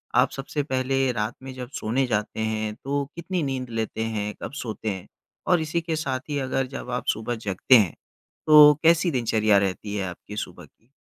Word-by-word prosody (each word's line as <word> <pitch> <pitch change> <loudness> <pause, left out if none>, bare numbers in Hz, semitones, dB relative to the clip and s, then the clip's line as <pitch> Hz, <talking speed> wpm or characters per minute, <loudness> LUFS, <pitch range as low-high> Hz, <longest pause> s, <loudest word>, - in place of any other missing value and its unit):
आप - - +5
सबसे 145 +2 -3
पहले 135 -1 0
रात 110 0 -2
में 130 -1 -7
जब 125 -1 -7
सोने 125 +5 0
जाते 105 -1 -2
हैं 110 -1 -1
तो 140 +1 -1
कितनी 170 0 -2
नींद 130 -3 -3
लेते 110 -1 -2
हैं, 105 -2 -2
कब - - -4
सोते 110 -4 -4
हैं? 95 -2 -5 0.4
और 180 -3 +4
इसी 160 +2 -1
के 165 -1 -2
साथ 135 -4 -2
ही 145 - -1
अगर 130 0 -1
जब 135 -1 -7
आप 125 - -2
सुबह 115 +2 -4
जगते 100 +7 +4
हैं, 100 -7 +2 0.5
तो 150 -1 +9
कैसी 165 +1 +4
दिनचर्या 110 -5 +2
रहती 100 +1 -1
है 100 - -1
आपकी 95 +3 -10
सुबह - - -6
की? 115 - -32
125 Hz, 195 wpm, -25 LUFS, 110-140 Hz, 0.5 s, तो